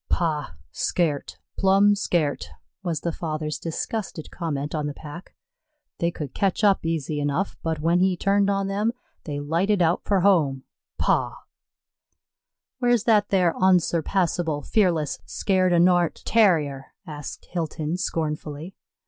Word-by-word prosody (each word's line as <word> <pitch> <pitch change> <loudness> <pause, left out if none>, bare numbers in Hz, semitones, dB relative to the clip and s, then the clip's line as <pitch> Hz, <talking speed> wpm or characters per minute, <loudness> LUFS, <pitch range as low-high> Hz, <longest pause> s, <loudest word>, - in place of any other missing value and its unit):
"Pah 155 - -1 0.2
scairt, 155 -5 -1 0.2
plumb 195 +2 +5
scairt," 170 -7 0 0.3
was 170 -6 -2
the 170 - -1
father's 155 -2 -4
disgusted 170 0 -4
comment 150 -4 -3
on 150 -2 -1
the 145 - -5
pack. 155 +4 -10 0.6
"They 170 - +1
could 150 -5 -6
catch 195 +2 0
up 200 -2 +4
easy 155 -2 -2
enough, 145 +7 -1
but 160 -2 -2
when 170 +3 +3
he 185 0 +2
turned 200 +2 +2
on 195 0 0
them, 210 +4 0 0.3
they 145 -2 -4
lighted 170 +8 +1
out 170 0 +2
for 195 -3 +1
home 155 -9 +3 0.3
pah!" - - +1 1.4
"Where's 245 -3 +2
that 210 -3 +3
thar 180 -4 +3
onsurpassable, 175 -3 +1
fearless, 175 -8 +1
scaired 185 -2 +1
o' 175 - +4
nort 175 -1 +3
Tarrier?" 155 -11 +2
asked 150 -4 -8
Hilton, 160 -2 -2
scornfully. 155 -1 -3
170 Hz, 130 wpm, -24 LUFS, 150-195 Hz, 1.4 s, plumb